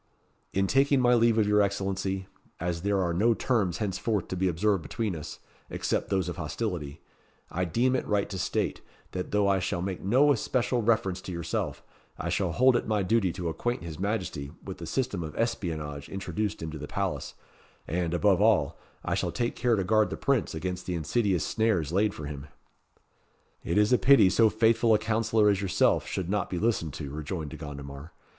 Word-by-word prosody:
"In 95 0 +1
taking 135 +5 +3
my 125 -1 +4
leave 115 -1 +4
of 110 - +4
your 105 0 +4
Excellency, 95 -1 -1 0.3
as 85 0 -2
there 100 +1 +1
are 85 -1 0
no 110 +6 +3
terms 105 -10 0
henceforth 105 0 -1
to - - -2
be 95 +1 +1
observed 95 +2 +1
between 105 +3 -3
us, 75 - -7 0.3
except - - -2
those 95 -2 0
of 85 - -4
hostility, 80 -3 -4 0.5
I 90 +2 -1
deem 120 +9 +1
it - - -2
right 105 -1 +1
to 95 - -4
state, - - -1 0.3
that 90 -1 -4
though 105 -1 +2
I 100 -1 +3
shall 90 -1 -2
make 95 -1 -4
no 130 +9 +4
especial 125 -1 0
reference 105 -5 +1
to 95 - -7
yourself, 85 -1 -3 0.3
I - - -3
shall 95 -4 0
hold 130 +8 +4
it - - 0
my 105 -2 +1
duty 95 -2 +2
to 90 -2 -4
acquaint 120 +6 -2
his 80 -2 -7
Majesty 95 -9 -2
with 95 - -7
the 85 - -6
system 120 -2 -1
of 75 -2 -6
espionage 80 - -3
introduced 100 -1 -3
into 80 -1 -5
the 75 - -6
palace; - - -3 0.5
and, 85 +1 -1
above 95 +1 +3
all, 105 -10 +3 0.3
I - - 0
shall - - -1
take 120 -1 -2
care 120 -2 +2
to 95 - 0
guard 110 +3 +3
the - - -5
Prince 135 -11 0
against 90 +2 -4
the 90 - -1
insidious 95 +2 0
snares 105 -9 +1
laid 100 +3 +1
for 75 - -6
him." 70 0 -7 1.2
"It 85 - -1
is 105 +3 +4
a 125 - +5
pity 135 -9 +6
so 110 +3 +5
faithful 115 +1 +3
a - - +5
councillor 110 0 +2
as 100 -2 +3
yourself 95 -3 +2
should 95 - -3
not 100 0 -1
be 90 - -3
listened 85 -7 0
to," 70 -3 -6
rejoined 75 +1 -5
De - - -7
Gondomar. 70 0 -8
95 Hz, 195 wpm, -28 LUFS, 85-110 Hz, 1.2 s, pity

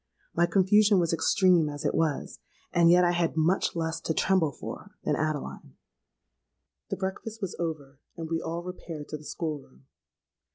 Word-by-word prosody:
My 170 +1 +3
confusion 205 +2 +4
was 170 -2 +2
extreme 175 -1 +3
as 145 0 -6
it - - +1
was; 160 -3 -1 0.3
and 170 -1 +5
yet 180 +1 +6
I 175 - +4
had 170 -2 0
much 170 +4 +2
less 160 -1 -2
to 160 - -2
tremble 185 -6 +2
for - - -9
than - - +1
Adeline. 155 - -3 1.1
"The - - -2
breakfast 200 +4 -4
was 195 -4 -4
over; 145 -5 -4 0.2
and 165 -1 -5
we 165 0 -1
all 170 +1 -4
repaired 170 -4 -7
to 155 - -4
the 150 - -15
school 155 -1 -3
room. 65 - -21
165 Hz, 170 wpm, -28 LUFS, 155-180 Hz, 1.1 s, yet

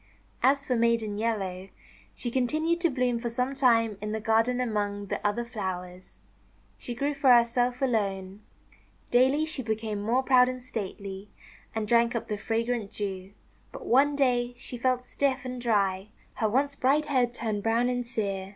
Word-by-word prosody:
As 280 +1 +3
for 255 - 0
Maiden 230 -3 +1
Yellow, 195 -4 -2 0.5
she 240 - -4
continued 310 +7 0
to 340 - +3
bloom 250 -3 0
for 235 0 -3
some 250 +3 -1
time 230 -6 +2
in 210 0 -3
the 220 - -2
garden 225 +3 +2
among 205 -4 -2
the - - -4
other 210 +3 0
flowers. 185 -5 -6 0.6
She 240 - -4
grew 280 +4 -1
for 275 -2 +4
herself 245 +2 +3
alone. 200 -5 -1 0.7
Daily 265 +5 +4
she 315 -4 -1
became 220 -2 -3
more 240 +5 +1
proud 255 -1 +5
and 255 0 -5
stately, 200 -4 -6 0.5
and 220 -1 -2
drank 235 +2 +3
up 235 - -3
the 210 - -2
fragrant 230 0 -1
Dew. 195 -2 -5 0.4
But - - -9
one 280 +4 +4
day 245 -3 +1
she 245 - -4
felt 250 +1 0
stiff 270 -1 -1
and 250 -1 -5
dry. 200 -4 +1 0.3
Her 220 - 0
once 280 +5 +1
bright 280 +3 +2
head 255 -5 +1
turned 220 -4 -3
brown 230 +3 +2
and 245 0 -1
sere. 200 -5 -3
235 Hz, 170 wpm, -27 LUFS, 210-255 Hz, 0.7 s, proud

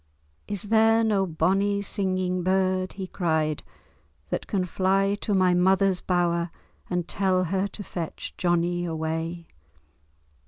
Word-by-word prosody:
"Is 205 0 -4
there 225 0 +4
no 200 -3 +2
bonnie 195 +4 +1
singing 185 -2 0
bird," 185 0 +1
he 195 -1 -5
cried, 160 -5 -1 0.7
"that - - -2
can 190 -3 0
fly 195 +2 +1
to 205 - 0
my 185 -1 +4
mother's 190 +1 +3
bower 175 -1 +1 0.4
and 180 -2 -1
tell 185 -2 +1
her 190 +3 0
to 205 - -8
fetch 170 -4 -6
Johnie 175 0 +1
away?" 165 +1 -3
185 Hz, 125 wpm, -26 LUFS, 175-195 Hz, 0.7 s, there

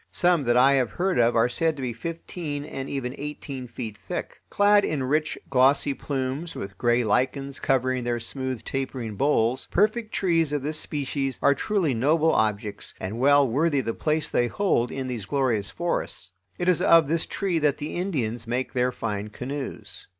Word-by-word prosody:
Some 175 -5 +2
that 120 0 +3
I 135 +2 +6
have 130 -4 +2
heard 185 -6 0
of 120 0 +4
are 115 +1 +4
said 160 +6 0
to 140 - -7
be 120 -2 -2
fifteen 155 +2 -5
and 135 -3 -6
even 130 -3 -3
eighteen 140 -3 -6
feet 115 -2 -6
thick. - - -6
Clad 205 0 +4
in 145 -4 -1
rich, 150 +4 0
glossy 135 +2 +3
plumes, 135 +4 -3
with 95 0 -6
gray 120 +4 +2
lichens 130 +5 0
covering 130 -1 +1
their 120 0 -1
smooth, 130 0 -4
tapering 130 -4 -4
boles, 130 0 +1
perfect 215 +3 +1
trees 165 -5 +1
of 145 -2 -1
this 155 +2 0
species 140 -3 -2
are 140 - +6
truly 175 0 0
noble 155 +7 +3
objects 105 -1 -1
and 100 +5 -4
well 140 +1 +5
worthy 145 +4 +1
the 115 -2 -2
place 155 +4 -1
they 120 - +1
hold 125 - +1
in 135 -1 -4
these 120 -6 -5
glorious 120 -7 0
forests. 140 - -3 0.3
It 175 - -2
is 180 -3 +3
of 165 -3 +6
this 165 +2 0
tree 185 -4 -1
that 150 -2 +2
the 150 - -5
Indians 125 - -2
make 125 +2 -2
their 125 -1 +1
fine 105 -4 -3
canoes. 130 +5 -6
135 Hz, 180 wpm, -25 LUFS, 120-155 Hz, 0.3 s, I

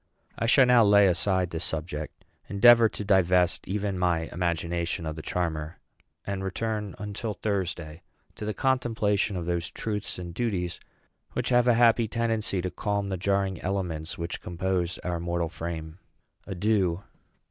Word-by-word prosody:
I 115 - -1
shall 130 +2 +6
now 125 -2 +6
lay 100 -1 +6
aside 95 0 +1
this 80 0 -3
subject; 75 -1 -5 0.2
endeavor 115 +2 +7
to 105 - -6
divest 90 -3 +3
even 100 -1 -2
my 85 -2 +1
imagination 85 -1 -2
of 80 -1 -3
the 80 - -6
charmer; 80 -1 -3 0.5
and 100 -1 -3
return, 105 +1 -3
until 105 +1 -4
Thursday, 85 -6 -3 0.3
to - - -9
the 105 0 -2
contemplation 110 -6 +1
of 85 - -4
those 85 0 -1
truths 105 -2 -4
and 85 -1 -7
duties 90 -5 -2 0.5
which - - -1
have 120 -1 +4
a 120 - +5
happy 115 -1 +4
tendency 110 -4 -1
to 90 - -2
calm 100 -1 -2
the 95 - -1
jarring 95 0 0
elements 90 -5 -3
which 85 +1 -4
compose 90 0 -2
our 90 -1 -2
mortal 85 -1 -1
frame. 80 0 -6 0.5
Adieu. 95 -2 0
95 Hz, 150 wpm, -27 LUFS, 85-105 Hz, 0.5 s, endeavor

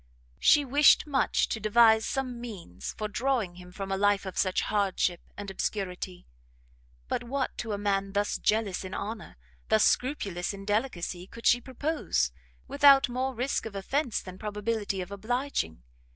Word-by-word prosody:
She 290 -1 +5
wished 285 +3 +5
much 285 -3 +1
to 220 - -2
devise 220 +1 +5
some 255 -3 -3
means 185 - -7
for 215 - -2
drawing 220 -5 -1
him 180 0 -12
from 195 +1 -6
a 195 - 0
life 205 0 +2
of 190 - -6
such 185 -1 +1
hardship 190 -4 0 0.2
and 205 -1 -6
obscurity; 185 -2 -4 0.8
but - - -2
what 260 +2 -2
to 225 -3 -3
a - - -1
man 195 -1 -1
thus 205 0 0
"jealous 210 -4 0
in 185 0 -6
honour," 215 - -6 0.3
thus 110 - +5
scrupulous 200 -9 0
in 195 0 -10
delicacy, 195 -5 -2
could 230 - -12
she 245 - +5
propose, 255 - -1 0.4
without 280 -2 +6
more 255 +1 -2
risk 250 0 -1
of 210 - -10
offence, 245 +5 -1
than 185 0 -10
probability 210 -2 -2
of 180 - -7
obliging? 220 - -2
210 Hz, 160 wpm, -28 LUFS, 190-245 Hz, 0.8 s, without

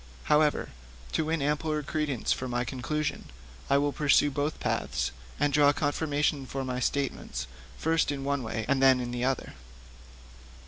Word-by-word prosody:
However, 150 0 +3 0.4
to 160 - 0
win 160 -2 0
ampler 150 +1 0
credence 145 -4 0
for 130 - -4
my 120 0 -1
conclusion, 140 +4 -2 0.4
I 140 - +5
will 145 +1 +2
pursue 145 0 +4
both 145 +3 -2
paths, - - -1 0.3
and 145 -1 +2
draw 145 -1 +6
confirmation 145 -1 0
for 135 0 -3
my 125 -1 -2
statements 130 - -2 0.3
first 160 -1 +1
in 140 -1 -4
one 140 0 0
way 110 -1 -3
and 140 -1 +2
then 130 -1 +6
in 120 -1 -3
the 120 0 -2
other. 135 -1 -1
140 Hz, 155 wpm, -29 LUFS, 130-150 Hz, 0.4 s, draw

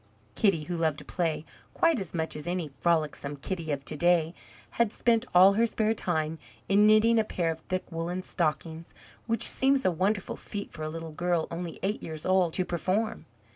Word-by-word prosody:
Kitty, 190 - +2
who 175 +3 -4
loved 160 -3 0
to - - -10
play 165 -3 -2 0.3
quite 330 -6 +3
as 190 -4 -4
much 160 -2 -3
as 150 +2 -6
any 175 -4 -2
frolicsome 155 -4 0
Kitty 160 +2 -4
of 140 -1 -3
to - - -5
day, 170 +1 +3 0.4
had 235 -3 +1
spent 235 +1 +1
all 190 +2 +8
her 230 +3 +3
spare 220 0 +1
time 160 -6 -2 0.3
in 205 +2 +5
knitting 220 +2 +5
a - - +3
pair 175 -5 -1
of 160 - -6
thick 185 0 -1
woollen 170 +3 -3
stockings, 165 -1 -3 0.3
which 230 0 +1
seems 270 0 +2
a 185 - +4
wonderful 195 +4 -1
feat 200 -1 -6
for 155 - -10
a 155 - -2
little 165 0 -6
girl 175 0 0
only 170 0 -5
eight 205 +3 -1
years 155 -1 -6
old 185 -3 +3
to 185 - +1
perform! 190 +6 -1
175 Hz, 195 wpm, -28 LUFS, 160-205 Hz, 0.4 s, all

